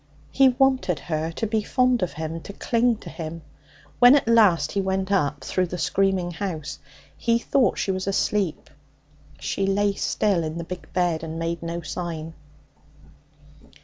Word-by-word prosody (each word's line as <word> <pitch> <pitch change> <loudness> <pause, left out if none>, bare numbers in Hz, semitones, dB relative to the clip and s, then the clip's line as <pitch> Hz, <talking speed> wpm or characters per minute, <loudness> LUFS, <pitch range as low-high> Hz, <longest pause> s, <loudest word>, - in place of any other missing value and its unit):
He 270 -1 +5
wanted 260 - +2
her 155 +3 -3
to 225 - -2
be 220 0 0
fond 250 +2 +2
of 180 - -1
him, 160 +1 -5
to 200 - -9
cling 235 +3 +1
to - - -9
him. 165 -1 -7 0.6
When 245 +2 +8
at 280 - +1
last 190 -10 +4
he 200 - 0
went 190 0 -1
up 150 -7 +1
through 185 +6 0
the 180 - -5
screaming 185 +1 +1
house, 160 -6 -5 0.4
he 230 -1 +1
thought 255 +2 +1
she 195 - 0
was 185 0 -3
asleep. 195 -3 -1 0.7
She 195 - -1
lay 200 +1 +2
still 195 -3 0
in 155 +1 -4
the 170 - -4
big 180 +1 -8
bed 175 -3 0
and 160 0 -6
made 165 +1 -3
no 170 +1 -4
sign. 165 -1 -5
185 Hz, 165 wpm, -24 LUFS, 165-210 Hz, 0.7 s, When